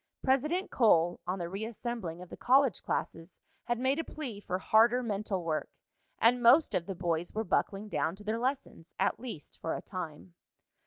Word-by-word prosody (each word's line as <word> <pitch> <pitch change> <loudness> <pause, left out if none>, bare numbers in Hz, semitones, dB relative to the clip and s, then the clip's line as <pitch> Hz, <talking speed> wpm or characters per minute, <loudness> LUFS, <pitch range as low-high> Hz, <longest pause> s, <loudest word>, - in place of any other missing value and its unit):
President 305 +8 +1
Cole, 175 -8 +4
on 185 +2 -1
the 175 -2 -3
reassembling 205 -3 -5
of 180 - -14
the - - -8
college 265 -3 +3
classes, 165 +2 -4 0.3
had 240 -1 0
made 260 +5 +1
a - - 0
plea 260 -12 -6
for 185 -3 -3
harder 230 +6 +4
mental 205 -4 -2
work, 160 -2 -2 0.5
and 245 +2 +4
most 265 +7 +6
of 170 - -1
the 195 - -4
boys 170 0 -2
were 220 - 0
buckling 205 -1 0
down 165 -4 -1
to 205 - -14
their 215 +2 -1
lessons, 255 -9 -3
at - - +1
least 230 -11 -8
for 165 - -2
a - - -5
time. 180 -2 -7
210 Hz, 180 wpm, -31 LUFS, 175-245 Hz, 0.5 s, most